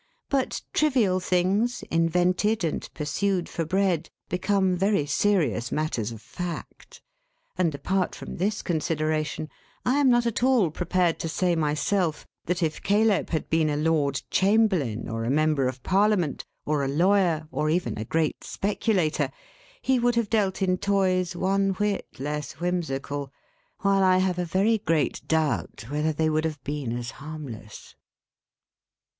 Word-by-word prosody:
But 275 -2 -1
trivial 245 -12 +3
things, 190 +7 +1
invented 180 +5 +2
and 160 - -2
pursued 180 +4 -1
for 165 - -3
bread, 180 -2 +1 0.2
become 190 +1 +1
very 195 -4 +1
serious 150 - +1
matters 125 -8 -1
of 110 -1 -10
fact; 175 +6 -7 0.5
and, 170 -5 +1
apart 185 +7 -1
from - - -8
this 205 +4 -1
consideration, 155 -2 -1 0.4
I 260 +3 +3
am 280 -2 +4
not 240 -1 +4
at 235 -1 -1
all 245 -10 +3
prepared 180 0 0
to 165 - -3
say, 175 +1 +1
myself, 160 +2 0 0.2
that 180 +1 -1
if 155 -1 -1
Caleb 210 0 +2
had 160 - -2
been 160 -1 +3
a 145 - 0
Lord 150 -3 +1
Chamberlain, 190 - +2
or 115 0 -3
a 115 - -1
Member 150 -1 +2
of 130 0 -5
Parliament, 195 -5 +1 0.2
or 150 -2 0
a - - 0
lawyer, 170 +1 +2
or 155 - 0
even 170 -7 0
a - - -2
great 155 +6 -1
speculator, 195 -5 0 0.5
he 260 -1 +2
would 240 0 +2
have 235 -3 0
dealt 200 -4 +1
in 185 -1 +1
toys 185 -3 +1
one 195 +2 +1
whit 205 +1 -1
less 150 +1 -4
whimsical; 145 -5 -3 0.5
while 195 -1 +3
I 185 -1 +5
have 185 -1 +1
a 180 - 0
very 200 +6 +2
great 160 -5 0
doubt 155 -7 0
whether 150 +2 0
they 155 +1 0
would 155 0 +1
have 155 -4 -4
been 145 -4 -3
as 120 -1 -5
harmless. 140 -8 -9
175 Hz, 150 wpm, -26 LUFS, 150-195 Hz, 0.5 s, I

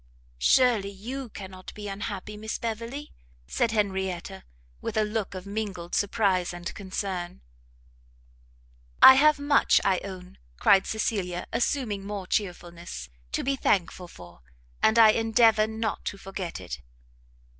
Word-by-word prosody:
"Surely, 230 - +4
you 240 +6 -6
cannot 190 -2 -9
be 210 -1 -7
unhappy, 205 +1 -5
Miss 215 +1 -4
Beverley!" 235 +6 -5 0.3
said 225 - 0
Henrietta, 190 -3 -2 0.4
with - - -4
a 215 - +4
look 210 -2 -3
of 185 0 -7
mingled 200 -4 -5
surprise 195 -4 +1
and 175 0 -6
concern. 185 -2 -5 1.6
"I 265 - +13
have 300 +3 +5
much, 285 0 +4
I 190 -2 +3
own," 185 -2 -10 0.2
cried 195 - +4
Cecilia, 195 -5 -2
assuming 230 -4 -1
more 200 -1 -5
chearfulness, 175 -3 -4 0.2
"to - - -1
be 275 +1 +1
thankful 185 -6 0
for, 85 - -14 0.4
and 220 +1 +4
I 225 -1 +9
endeavour 225 -1 +4
not 220 0 -3
to 200 - -3
forget 190 -3 -6
it." 60 +3 -7
200 Hz, 130 wpm, -27 LUFS, 185-225 Hz, 1.6 s, I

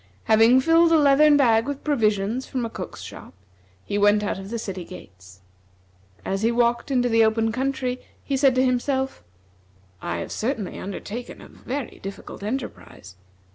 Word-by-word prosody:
Having 225 +4 +5
filled 330 +3 +4
a 325 - +6
leathern 290 0 +5
bag 230 -3 +3
with 285 -1 -5
provisions 220 -3 0
from 250 -3 -3
a 225 - -6
cook's - - -7
shop, - - -11 0.5
he 205 - -2
went 205 +1 +4
out 200 - -2
of 195 0 -8
the 235 - -3
city 195 -5 -5
gates. 95 - -14 0.8
As 195 +1 -2
he 225 +1 +2
walked 235 +2 +1
into 250 -2 +2
the 225 -1 +4
open 225 0 +2
country, 255 0 -2 0.2
he 275 - -2
said 270 -1 +3
to 255 +1 +3
himself: 265 - -1 0.8
"I 85 - -3
have 85 - -6
certainly 225 -4 -3
undertaken 210 +5 -7
a - - -12
very 265 0 -6
difficult 195 0 -8
enterprise. 210 - -6
235 Hz, 165 wpm, -23 LUFS, 205-265 Hz, 0.8 s, a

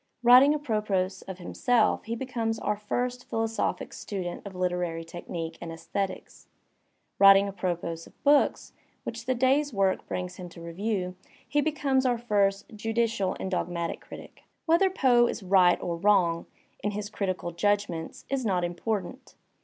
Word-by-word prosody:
Writing 250 +4 +8
apropos 210 -9 0 0.2
of 190 -2 -6
himself 225 +5 +1
he 230 +1 -3
becomes 230 -3 -2
our 210 - -1
first 245 +4 -3
philosophic 225 0 -2
student 185 -4 -5
of 195 - -9
hterary 180 -2 -2
technique 165 -1 -6
and 170 -1 -6
aesthetics. 185 +4 -5 0.7
Writing 195 0 +8
apropos 175 -4 -3
of - - -22
books 290 0 +3 0.3
which 230 +1 -6
the 255 - +2
day's 270 +4 +2
work 195 -3 0
brings 180 0 -4
him 180 -1 -8
to 170 - -13
review, 180 +2 -3 0.3
he 295 - +2
becomes 285 -3 +1
oiu* 245 -2 +1
first 200 -4 +1
judicial 225 -3 0
and 190 - -4
dogmatic 170 -2 -2
critic. - - -12 0.2
Whether 340 +4 +4
Poe 245 -9 +4
is 215 - -4
"right" 180 -2 +5
or 170 -1 -3
"wrong" 175 -3 +2 0.4
in 205 - +1
his 210 0 -5
critical 185 -4 -2
judg 205 +4 +1
ments 160 -2 -7
is 270 -1 -1
not 185 -5 +1
important. 205 +7 -4
200 Hz, 150 wpm, -27 LUFS, 180-240 Hz, 0.7 s, Writing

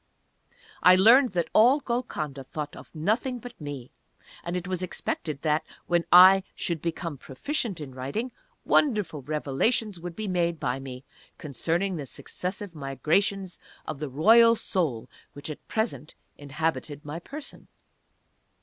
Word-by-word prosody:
I 180 - +8
learned 230 +5 +6
that 175 -2 -1
all 250 +7 +6
Golconda 155 - -3
thought 150 +2 -6
of - - -12
nothing 220 - 0
but 240 -4 -11
me. 140 -4 -7 0.5
And 175 +1 -3
it 180 0 -5
was 185 -1 -2
expected 155 -5 -4
that, 155 -1 +1 0.2
when 175 -1 +1
I 185 +2 +9
should 170 -3 -2
become 165 -3 -4
proficient 215 - -3
in 140 -4 -8
writing, 140 - -4 0.3
wonderful 210 - +2
revelations 155 - -1
would 175 0 -7
be 215 -1 -4
made 170 -3 0
by 125 +1 -1
me, 130 -1 -8 0.3
concerning 165 +6 -2
the 145 -3 -6
successive 185 +7 -5
migrations 170 +7 -1 0.3
of 155 -3 -5
the 150 -2 -4
Royal 230 - +6
Soul 155 - -1 0.3
which 145 +2 -6
at 150 - -11
present 185 - -3 0.2
inhabited 145 0 -3
my 150 +3 -5
person. 285 - -9
170 Hz, 140 wpm, -27 LUFS, 145-205 Hz, 0.5 s, I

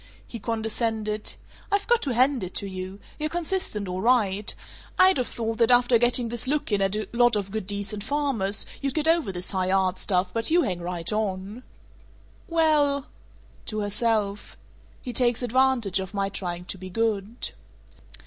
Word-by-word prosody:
He 230 - -8
condescended: 220 -1 -2 0.4
"I've 405 0 +1
got 475 -1 +3
to 260 -5 -2
hand 255 -1 +3
it 180 - -6
to - - -1
you. 185 +1 -7 0.2
You're 305 0 -1
consistent, 340 - -2
all 180 +1 -3
right. 210 -4 +2 0.5
I'd 370 -5 +5
of 250 - -1
thought 225 -1 -4
that 230 0 +4
after 245 -1 +5
getting 240 0 +4
this 240 +2 +1
look 290 -3 -1
in 205 -1 +2
at 195 +1 +2
a 215 - -3
lot 240 -1 +4
of 200 -2 -2
good 215 -3 -4
decent 205 +1 -2
farmers, 260 -9 0 0.2
you'd 275 -1 -2
get 310 0 +2
over 325 -10 +3
this 180 -1 -1
high 185 -2 0
art 190 -1 +1
stuff, 180 -1 +1
but 225 0 +3
you 340 +2 +4
hang 180 -3 -2
right 170 +1 -3
on." 205 +1 -3 0.9
"Well 300 -4 +2 0.3
" - - -28
To 215 -1 -1
herself: 210 -1 -1 0.5
"He 250 - -5
takes 240 0 +2
advantage 245 -5 +2
of 190 +1 -6
my 195 0 0
trying 180 -3 -5
to 190 - -3
be 185 0 -8
good." 220 +2 -1
220 Hz, 175 wpm, -25 LUFS, 195-255 Hz, 0.9 s, I'd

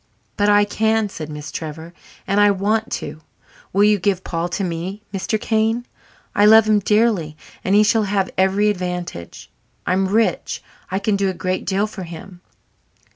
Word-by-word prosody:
"But 205 0 +2
I 205 0 +5
can," 220 0 +1
said 155 -5 -7
Miss 150 0 -7
Trevor, 160 +1 -7 0.3
"and 200 +1 +1
I 205 0 +6
want 210 +3 0
to. 155 +1 -5 0.5
Will 200 +2 +3
you 210 -1 +4
give 190 0 0
Paul 170 0 -3
to 195 - -2
me, 185 +4 -4
Mr. 200 +3 -1
Kane? 225 +2 0 0.5
I 205 - +3
love 220 0 +7
him 215 -1 +4
dearly 205 -7 +1 0.3
and 190 - +2
he 210 - +6
shall 215 0 +2
have 195 -1 0
every 195 +2 +3
advantage. 180 - -6 0.3
I'm 190 +1 +1
rich 220 +3 0 0.3
I 190 - -1
can 200 +1 0
do 195 -1 +1
a 185 - -4
great 185 +1 -3
deal 195 +2 +1
for 215 -2 -8
him." 175 +1 -10
195 Hz, 175 wpm, -20 LUFS, 180-210 Hz, 0.5 s, love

